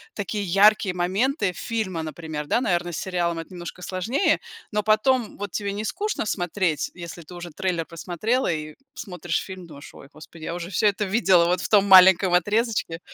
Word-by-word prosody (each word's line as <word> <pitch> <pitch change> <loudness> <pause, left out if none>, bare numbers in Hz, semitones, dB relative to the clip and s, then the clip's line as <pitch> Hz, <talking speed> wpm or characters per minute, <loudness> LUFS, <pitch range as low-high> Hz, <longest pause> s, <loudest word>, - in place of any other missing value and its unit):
такие 205 0 -3
яркие 195 0 +4
моменты 195 - 0
фильма, 205 -8 -3
например, 155 -1 -6
да. 240 - +1
Наверно, 175 -5 0
с 160 - -5
сериалом 175 -2 -1
это 165 +3 -7
немножко 175 +1 -8
сложнее. 205 - 0 0.3
Но 210 0 0
потом 220 +2 +1
вот 205 -1 -5
тебе 200 +1 -3
не 210 +2 -4
скучно 420 - -2
смотреть, 175 -4 -1
если 170 -1 -8
ты 175 +3 -12
уже 175 0 -8
трейлер 170 0 -2
просмотрела 180 +9 -1
и 155 -1 -4 0.2
смотришь 180 -5 -3
фильм, 185 -3 -9
думаешь: 145 -2 -12
"Ой, - - -13
господи, 155 +1 -12
я 170 - -4
уже 175 +2 -6
всё 210 +3 +2
это 205 +1 0
видела 190 -4 +4
вот 180 +1 +1
в - - -4
том 205 -2 +5
маленьком 190 -1 +7
отрезочке?" 205 -2 0
185 Hz, 185 wpm, -24 LUFS, 170-210 Hz, 0.3 s, маленьком